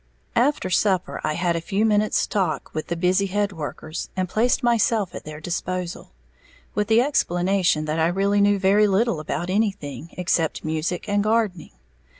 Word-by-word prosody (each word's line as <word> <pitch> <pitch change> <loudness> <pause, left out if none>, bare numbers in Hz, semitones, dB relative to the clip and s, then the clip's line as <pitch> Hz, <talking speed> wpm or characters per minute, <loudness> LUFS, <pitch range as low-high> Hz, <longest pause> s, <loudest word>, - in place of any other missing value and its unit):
After 245 -6 +1
supper 185 0 +1
I 155 - 0
had 170 +1 0
a 165 - -2
few 195 +5 0
minutes 210 -1 +2
talk 190 -6 -2
with 155 - -4
the 170 - -2
busy 185 +3 +2
head 205 +1 0
workers, 155 -1 -6
and 185 0 0
placed 240 +7 +1
myself 230 -4 +2
at - - -8
their 150 0 -8
disposal, 175 +2 -4 0.6
with 210 -1 0
the 225 +2 +5
explanation 180 - +1
that 155 +1 -2
I 160 - +3
really 200 +3 +1
knew 205 0 +4
very 200 +2 +4
little 200 -2 +1
about 170 +3 -3
anything, 190 -7 -2
except 170 -4 0
music 160 +4 -2
and 205 0 +1
gardening. 215 -5 0
190 Hz, 165 wpm, -23 LUFS, 170-210 Hz, 0.6 s, the